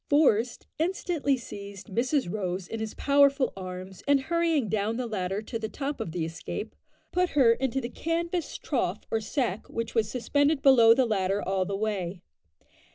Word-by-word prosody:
Forest 250 -6 +3
instantly 325 -5 0
seized 200 -3 -9
Mrs 255 - +1
Rose 185 -1 -3
in 225 - -5
his 220 -1 -4
powerful 280 -1 +3
arms, 185 0 -7
and 285 -1 +5
hurrying 325 -2 +1
down 215 +2 0
the 250 - -2
ladder 200 -2 -2
to 230 +1 -4
the 220 -1 -3
top 280 +5 -4
of 180 - -4
the 165 -1 -2
escape, 165 0 -6 0.4
put 360 0 +2
her 250 -5 +7
into 265 +2 -1
the 235 - -3
canvas 335 +5 -2
trough 220 - -1
or 225 - +1
sack 220 -2 -2
which 230 0 -4
was 220 -3 +1
suspended 285 +4 +1
below 235 -5 +7
the 260 0 +3
ladder 195 -3 0
all 190 -1 +1
the 195 +1 -3
way. 195 -4 -3
230 Hz, 170 wpm, -28 LUFS, 200-280 Hz, 0.4 s, her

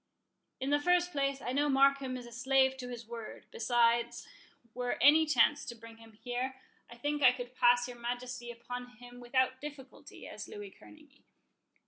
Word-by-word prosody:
"In 270 +2 -2
the 290 - +4
first 355 +3 +2
place, 275 -2 -1
I 245 - -2
know 290 +3 +1
Markham 275 -1 +3
is 245 - -9
a 240 - -12
slave 265 +2 +2
to 250 -1 -6
his 240 -1 -7
word: 230 -1 -8
besides, 235 - +1 0.5
were 245 0 -2
any 310 +3 +6
chance 295 -1 +3
to 235 - -6
bring 230 0 -13
him 225 -1 -16
here, 245 +4 -4 0.3
I 235 - -11
think 290 +4 -2
I 255 -2 +8
could 245 0 -7
pass 245 0 +4
your 245 -1 -10
Majesty 245 0 -5
upon 245 +1 -8
him 245 0 -13
without 260 +1 0
difficulty, 285 -3 -10
as - - -8
Louis 415 -2 -9
Kerneguy. 305 -2 -18
250 Hz, 175 wpm, -32 LUFS, 240-275 Hz, 0.5 s, I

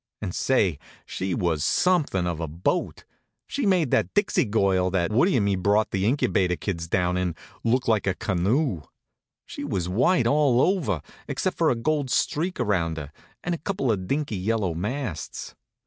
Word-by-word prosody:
And 95 -4 -4
say, 100 - +1 0.3
she 95 -1 -3
was 80 -4 0
somethin' 155 - +2
of 85 -2 -2
a 80 - -3
boat. 80 +5 -2 0.4
She 275 -6 -2
made 180 -8 +2
that - - +2
Dixie 205 -1 +2
Girl, 95 -3 +2
that 90 -1 0
Woodie 135 - +3
and 105 - +2
me 100 -1 +2
brought 100 +3 +2
the 95 +1 0
Incubator 110 -8 +1
kids 85 -3 -4
down 90 +1 +1
in, 90 -2 -1 0.3
look 125 +2 +1
like 110 -3 +2
a 95 - +1
canoe. 100 - 0 0.6
She - - -7
was 100 -11 -2
white 120 - +2
all 140 -4 +3
over, 135 - +1 0.2
except - - -1
for - - +2
a - - +2
gold 145 +3 -1
streak 170 +8 0
around 90 -8 0
her, 75 -2 -6 0.3
and 175 - -1
a 170 - -3
couple 150 - -1
of 95 -4 -2
dinky 140 -5 -1
yellow 100 -2 0
masts. 105 - -4
105 Hz, 175 wpm, -25 LUFS, 90-140 Hz, 0.6 s, Woodie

